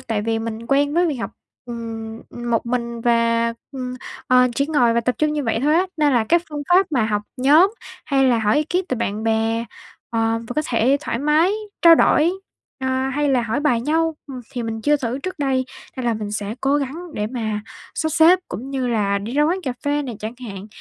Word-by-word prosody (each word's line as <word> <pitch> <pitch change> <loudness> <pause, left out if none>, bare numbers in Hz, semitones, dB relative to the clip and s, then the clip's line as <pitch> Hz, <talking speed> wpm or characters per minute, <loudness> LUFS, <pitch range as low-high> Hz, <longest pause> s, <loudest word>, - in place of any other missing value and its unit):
tại 215 -2 -2
vì 225 +1 0
mình 225 0 -5
quen 285 +3 +2
với 350 +1 +3
việc 300 -5 -1
học, 235 - -4 0.3
ừm, 225 -2 -6
một 240 -1 -2
mình 235 -1 -2
và, 230 0 +2 0.2
ừm, 255 -1 -5 0.3
ờ, 250 0 +5
chỉ 280 +3 +1
ngồi 245 -7 +3
và 235 - +3
tập 250 +2 0
trung 305 0 +2
như 295 -2 -2
vậy 225 -1 0
thôi 300 +2 +3
á. 365 +3 +3
Nên 295 -2 +3
là 235 -3 +3
cái 340 +8 +3
phương 295 -1 -5
pháp 365 +2 +5
mà 245 -6 +2
học 210 -1 -1
nhóm 310 - +5 0.3
hay 270 -1 +2
là 245 -3 +3
hỏi 215 -1 +2
bí 300 - +3
kíp 360 +4 -1
từ 255 - -1
bạn 215 -1 -2
bè, 225 +1 +1 0.5
ờ, 225 0 +1
và - - -3
có 305 - +2
thể 250 +4 +2
thoải 265 -6 -3
mái 305 +7 +3 0.3
trao 335 -1 +9
đổi, 325 0 +4 0.5
a, 260 0 -1
hay 290 +2 0
là 260 -3 +2
hỏi 235 +5 -1
bài 270 -6 +2
nhau, 320 +5 +1
ừm, 265 -3 -7
thì 245 -2 -3
mình 225 -1 -4
chưa 295 +3 +3
thử 250 -1 -3
trước 370 +4 -6
đây. 265 -2 +1 0.3
Nên 255 - -3
là 235 - +2
mình 210 -1 -5
sẽ 210 0 -3
cố 275 +1 +2
gắng 280 +1 -3 0.2
để 210 - -1
mà 220 -3 -3 0.3
sắp 315 - 0
xếp 330 +4 +6
cũng 260 +5 -6
như 265 -2 -1
là 205 -4 +1
đi 210 +4 -6
ra 290 +2 +3
quán 345 +5 +1
cà 255 - -2
phê 290 +1 +1
này 245 -6 -6
chẳng 220 +2 -5
hạn, 195 -1 -7
250 Hz, 230 wpm, -21 LUFS, 225-295 Hz, 0.5 s, trao